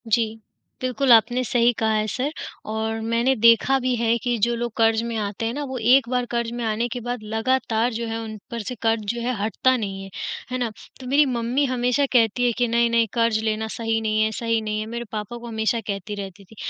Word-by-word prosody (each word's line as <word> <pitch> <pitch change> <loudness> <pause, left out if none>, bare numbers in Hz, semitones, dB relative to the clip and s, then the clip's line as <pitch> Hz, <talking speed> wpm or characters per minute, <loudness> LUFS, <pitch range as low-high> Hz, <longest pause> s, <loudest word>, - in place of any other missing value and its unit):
जी। 225 0 +1 0.4
बिल्कुल, 255 +1 +1
आपने 240 +2 +5
सही 240 0 +3
कहा 220 0 +2
है 215 0 +1
सर 260 +7 -2 0.4
और 220 0 -2
मैंने 230 +4 +1
देखा 230 +3 +5
भी 255 -1 0
है 230 0 +2
कि 240 +1 -1
जो 240 +1 +3
लोग 240 0 -3
कर्ज़ 225 0 +3
में 235 -1 -3
आते 210 +1 -3
हैं 230 - -1
ना 290 +2 -3
वो 260 - -3
एक 245 +2 +4
बार 250 -1 0
कर्ज़ 235 -1 -2
में 240 0 -4
आने 220 +2 0
के 245 - -4
बाद 245 -1 -4
लगातार 230 +1 0
जो 230 +1 -3
है 225 0 -3
उन 220 -1 -6
पर 235 -1 -3
से 250 - -4
कर्ज़ 225 -1 +2
जो 235 - -5
है 250 +2 -1
हटता 240 +5 +2
नहीं 195 -4 -4
है, 195 - -9 0.4
है 255 - -1
ना? 245 -2 -1 0.3
तो 255 - -8
मेरी 285 +3 +4
मम्मी 250 +2 0
हमेशा 250 +1 +1
कहती 240 0 +3
है 240 - +3
कि 245 -1 +2
नहीं, 235 0 +2
नहीं 230 -1 +3
कर्ज़ 230 -2 +2
लेना 220 0 -1
सही 225 0 -1
नहीं 215 0 +1
है 220 - +1
सही 230 +1 0
नहीं 215 0 -2
है 215 - -3
मेरे 235 0 -4
पापा 215 +2 -5
को 240 0 -9
हमेशा 220 +1 0
कहती 205 +1 -4
रहती 200 -1 -8
थी। 220 - -18
230 Hz, 235 wpm, -23 LUFS, 220-245 Hz, 0.4 s, आपने